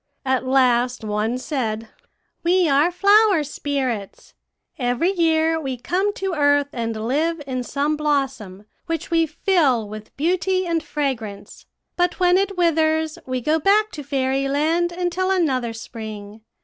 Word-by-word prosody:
At 260 -1 0
last 250 -2 +2
one 215 +3 -1
said, 230 -5 -3 0.5
"'We 355 +1 +3
are 285 +4 +4
flower 400 -1 +4
spirits. 265 -8 -4 0.5
Every 245 +8 +1
year 325 -3 +2
we 265 -3 -4
come 375 +11 0
to 385 -1 -3
earth 285 -2 +2
and 225 -2 -3
live 320 +6 0
in 255 -2 -3
some 285 +4 -1
blossom, 270 -10 -2 0.2
which 330 -1 -3
we 330 -1 +3
fill 305 - +1
with 215 +1 -10
beauty 370 +4 +1
and 335 -1 0
fragrance; 245 -11 -5 0.3
but 355 +1 0
when 360 0 +4
it 395 -1 -2
withers 315 -2 +1
we 255 -1 -2
go 310 +6 +1
back 420 +6 +3
to 300 - -7
Fairyland 280 +5 0
until 360 +1 -1
another 270 -11 +1
spring. 220 -2 -8
290 Hz, 135 wpm, -22 LUFS, 250-340 Hz, 0.5 s, are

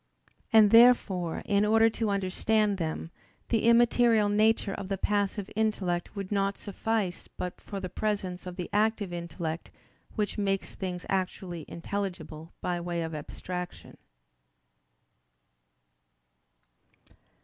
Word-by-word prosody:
And 215 -2 +7
therefore 220 -8 +5
in 200 0 +2
order 225 +1 +5
to 225 -1 -1
understand 200 +1 +1
them, 160 0 -3 0.4
the 225 -2 +1
immaterial 235 -2 +5
nature 215 -1 +2
of 195 - -6
the 195 - -1
passive 205 0 0
intellect 200 -5 -1
would 195 -1 -5
not 195 -1 0
suffice 205 -2 -2
but 180 - -5
for 200 - -6
the 185 - -4
presence 185 -2 -3
of 180 - -6
the 180 -2 -4
active 210 -3 +1
intellect 170 -1 -5 0.5
which 210 -1 -1
makes 195 -1 -1
things 180 -2 -5
actually 185 -3 -3
intelligible 175 -3 -5
by 175 -1 -1
way 170 -1 -2
of 160 0 -5
abstraction. 180 +4 -6
195 Hz, 115 wpm, -29 LUFS, 180-215 Hz, 0.5 s, And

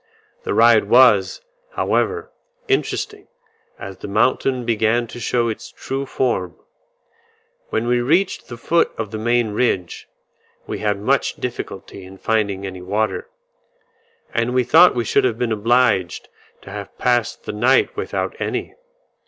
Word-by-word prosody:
The - - -1
ride - - +5
was, - - +4 0.3
however, 445 +2 -1 0.4
interesting, 405 +1 -2 0.5
as - - -8
the - - -7
mountain 130 -2 +1
began 115 +1 +1
to 120 - -10
show 120 0 0
its 110 - -5
true 135 +1 -5
form. 95 -11 -1 1.1
When 110 - -1
we 120 0 +2
reached 170 +10 +1
the 120 - -8
foot 170 +8 +1
of 110 -2 -4
the 110 - -5
main 120 0 +1
ridge, 100 -6 -1 0.6
we - - -5
had 105 -1 -1
much 135 +7 +1
difficulty 100 -5 -6
in 95 +1 -12
finding 100 -2 -1
any 95 -1 -7
water, 95 0 -2 1.0
and 120 +2 0
we 125 - +3
thought 165 +6 +6
we 120 -1 -1
should - - +2
have 120 -3 0
been 120 -1 -1
obliged 110 -4 +1 0.3
to 95 - -11
have 100 -1 -8
passed 120 -2 0
the - - -5
night 125 +5 +2
without 420 - -3
any. - - -3
115 Hz, 145 wpm, -20 LUFS, 105-125 Hz, 1.1 s, thought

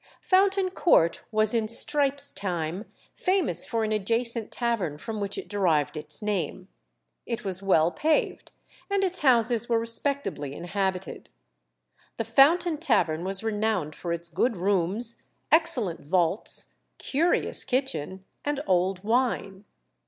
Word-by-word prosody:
Fountain 385 0 +2
Court 170 - +2
was 215 0 +5
in 225 -2 0
Strype's 280 +4 +3
time 180 0 -4 0.3
famous 370 -3 +2
for 230 -1 -1
an 215 - -2
adjacent 230 +2 -1
tavern 230 -11 -2
from 220 +6 -6
which 200 0 -4
it - - -6
derived 170 -9 0
its 150 +3 -5
name. 190 -2 -3 0.6
It 230 -3 -4
was 190 -1 -5
well 175 -4 +2
paved, 310 - -1 0.4
and 400 -1 0
its 370 -1 -1
houses 240 -3 +2
were 230 - +2
respectably 230 - -4
inhabited. 190 +1 -4 0.9
The - - -1
Fountain 300 +8 +3
Tavern 185 - +1
was 190 +2 -2
renowned 210 -7 -1
for 170 - -6
its 170 0 -2
good 195 +7 -1
rooms, 200 +5 +3 0.2
excellent 295 - +3
vaults, 175 +4 -1 0.3
"curious 330 +6 0
kitchen," 250 - -3 0.2
and 290 -1 -2
old 185 +1 0
wine. 220 -4 -1
215 Hz, 130 wpm, -26 LUFS, 185-265 Hz, 0.9 s, was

